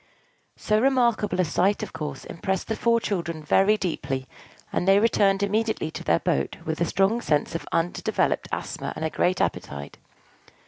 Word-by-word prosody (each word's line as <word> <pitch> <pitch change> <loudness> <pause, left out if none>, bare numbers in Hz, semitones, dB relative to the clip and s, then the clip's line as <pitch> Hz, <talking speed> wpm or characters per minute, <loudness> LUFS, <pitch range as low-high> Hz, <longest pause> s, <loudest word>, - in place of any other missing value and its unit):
So 215 0 +1
remarkable 235 -7 +2
a 185 - +4
sight, 190 +5 +1
of - - -7
course, 150 -4 -5
impressed 190 +4 -3
the 220 - 0
four 230 +1 +2
children 170 -7 -3
very 195 +7 +4
deeply; 135 -8 -3 0.5
and 180 - 0
they 195 0 +6
returned 200 -2 +3
immediately 215 -5 0
to - - -7
their 85 - +3
boat 70 -4 -1
with 160 +1 -3
a - - +4
strong 195 +7 +1
sense 150 -9 0
of 165 - -5
undeveloped 165 +1 0
asthma - - -4
and 160 - -3
a 160 - -1
great 180 0 +1
appetite. 70 0 -3
190 Hz, 170 wpm, -25 LUFS, 160-215 Hz, 0.5 s, they